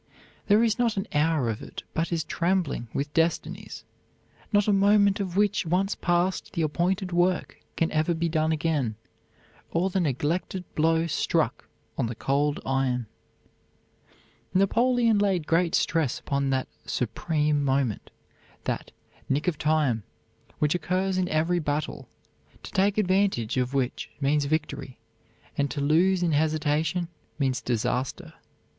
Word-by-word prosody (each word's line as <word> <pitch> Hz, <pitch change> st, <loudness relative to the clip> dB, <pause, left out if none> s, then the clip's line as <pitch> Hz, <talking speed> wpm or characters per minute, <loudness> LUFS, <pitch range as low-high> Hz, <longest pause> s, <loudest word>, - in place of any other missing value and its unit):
There 210 Hz, +2 st, +5 dB
is 225 Hz, 0 st, +1 dB
not 230 Hz, -4 st, +1 dB
an 195 Hz, -, -1 dB
hour 150 Hz, -3 st, +2 dB
of 110 Hz, -2 st, -2 dB
it -, -, -8 dB
but 165 Hz, +2 st, -1 dB
is 165 Hz, -2 st, 0 dB
trembling 170 Hz, -9 st, -1 dB
with 145 Hz, +1 st, -3 dB
destinies 165 Hz, +1 st, -1 dB, 0.7 s
not 205 Hz, -1 st, +3 dB
a 210 Hz, -, +4 dB
moment 200 Hz, 0 st, +4 dB
of 190 Hz, -2 st, -3 dB
which, 205 Hz, 0 st, +2 dB
once 185 Hz, +4 st, +1 dB
passed, 175 Hz, +2 st, 0 dB
the 170 Hz, -4 st, 0 dB
appointed 180 Hz, +5 st, 0 dB
work 175 Hz, +1 st, +1 dB, 0.2 s
can 165 Hz, -, 0 dB
ever 155 Hz, +2 st, +1 dB
be 170 Hz, +1 st, 0 dB
done 160 Hz, -1 st, +1 dB
again, 150 Hz, -8 st, 0 dB, 0.7 s
or 180 Hz, +3 st, 0 dB
the 190 Hz, -, +1 dB
neglected 165 Hz, +4 st, -1 dB
blow 165 Hz, +1 st, +2 dB
struck 165 Hz, -, 0 dB, 0.3 s
on -, -, +1 dB
the 115 Hz, -, -5 dB
cold 145 Hz, +4 st, 0 dB
iron." 130 Hz, -2 st, 0 dB, 1.5 s
Napoleon 230 Hz, +3 st, +3 dB
laid 190 Hz, -6 st, +1 dB
great 170 Hz, +1 st, +2 dB
stress 160 Hz, -7 st, +1 dB
upon 140 Hz, -1 st, -1 dB
that 130 Hz, -1 st, 0 dB, 0.2 s
"supreme 150 Hz, +5 st, 0 dB
moment," 135 Hz, -5 st, 0 dB, 0.5 s
that -, -, -3 dB, 0.4 s
"nick 145 Hz, +5 st, 0 dB
of 165 Hz, -5 st, 0 dB
time" 150 Hz, -7 st, +2 dB, 0.6 s
which 150 Hz, -1 st, +2 dB
occurs 185 Hz, +2 st, 0 dB
in 180 Hz, -1 st, 0 dB
every 165 Hz, +3 st, +1 dB
battle, 150 Hz, -1 st, -3 dB, 0.5 s
to -, -, -8 dB
take 200 Hz, +1 st, +2 dB
advantage 190 Hz, -, +1 dB
of 130 Hz, +1 st, -1 dB
which 130 Hz, -2 st, -1 dB
means 145 Hz, +1 st, +2 dB
victory, 150 Hz, -3 st, -3 dB, 0.6 s
and 140 Hz, 0 st, +2 dB
to 145 Hz, -, -4 dB
lose 175 Hz, +6 st, +3 dB
in 170 Hz, -, +2 dB
hesitation 155 Hz, +3 st, +1 dB, 0.3 s
means 135 Hz, -3 st, 0 dB
disaster. 125 Hz, +2 st, -2 dB
160 Hz, 140 wpm, -26 LUFS, 145-185 Hz, 1.5 s, There